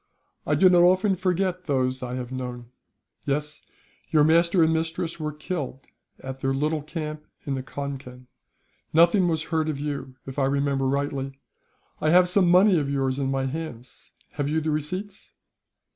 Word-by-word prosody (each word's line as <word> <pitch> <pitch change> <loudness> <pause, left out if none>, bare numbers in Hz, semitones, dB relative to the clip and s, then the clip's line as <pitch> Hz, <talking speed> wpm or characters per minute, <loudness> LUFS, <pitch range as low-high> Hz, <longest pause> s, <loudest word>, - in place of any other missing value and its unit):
"I - - +3
do 190 - +6
not 180 -1 +6
often 185 +3 +4
forget 185 0 -1
those 130 -3 0
I 125 0 -4
have 125 -1 -5
known. 125 -2 -6 0.5
Yes; 150 +1 -2 0.5
your 155 -3 +4
master 170 +3 +4
and 160 0 +3
mistress 165 +1 -2
were 150 -1 -2
killed, 150 -3 -5 0.3
at 130 0 -7
their 135 0 0
little 150 +2 0
camp 150 0 -6 0.2
on 140 - -2
the 135 - -2
Concan. 135 -2 -7 0.7
Nothing 170 +3 +5
was 160 -2 0
heard 160 -1 -1
of 145 -3 -3
you, 140 -3 -4
if 135 +1 -5
I 135 - +3
remember 140 -1 +1
rightly. 135 0 -2 0.6
I 155 - +1
have 180 +2 +6
some 180 0 +3
money 185 0 +6
of 140 -2 -2
yours 135 -1 0
in 135 -1 0
my 135 0 0
hands. 135 -4 -7 0.2
Have 145 0 -2
you 155 +1 +1
the 155 0 -1
receipts?" 185 +7 -4
150 Hz, 170 wpm, -25 LUFS, 135-170 Hz, 0.7 s, do